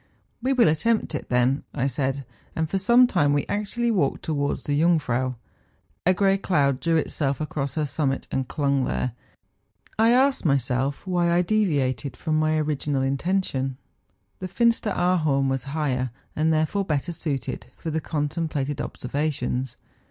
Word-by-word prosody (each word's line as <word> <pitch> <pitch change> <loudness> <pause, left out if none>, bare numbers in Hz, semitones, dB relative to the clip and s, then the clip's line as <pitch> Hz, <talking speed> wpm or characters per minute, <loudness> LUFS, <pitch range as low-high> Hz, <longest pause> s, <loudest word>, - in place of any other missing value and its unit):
' - - -44
We 260 +3 0
will 255 -7 +5
attempt 190 +7 +1
it, 150 - -5
then,' 125 +3 +2
I 130 - 0
said; 135 0 -1 0.3
and 160 0 0
for 195 +5 -1
some 240 +6 +6
time 145 - +2
we 145 - +1
actually 220 +3 -1
walked 180 -11 0
towards 145 -2 -1
the 145 +1 0
Jung¬ 170 -1 +4
frau. 130 -1 -1 0.7
A 185 - +6
grey 195 0 +3
cloud 140 -9 +1
drew 165 +4 +1
itself 140 -3 -1
across 145 -3 -3
her 155 -2 0
summit, 135 -1 -1
and 130 -1 -1
clung 140 -2 0
there. 125 - -1 0.9
I 225 +1 +5
asked 260 +3 +3
myself 135 -1 0
why 175 -2 +1
I 175 +1 +3
deviated 145 - 0
from 155 -2 0
my 155 0 +2
original 150 -2 -1
intention? 135 -2 -1 0.6
The 185 - -4
Finsteraarhorn 180 - +2
was 135 0 -2
higher, 135 -4 -1 0.3
and 155 +1 +2
therefore 160 +6 +1
better 155 -2 -1
suited 150 -5 -3
for 160 - -4
the 160 +1 -1
con¬ 150 -2 -1
templated 145 -3 -2
observations. 130 -2 -2
150 Hz, 160 wpm, -24 LUFS, 135-180 Hz, 0.9 s, some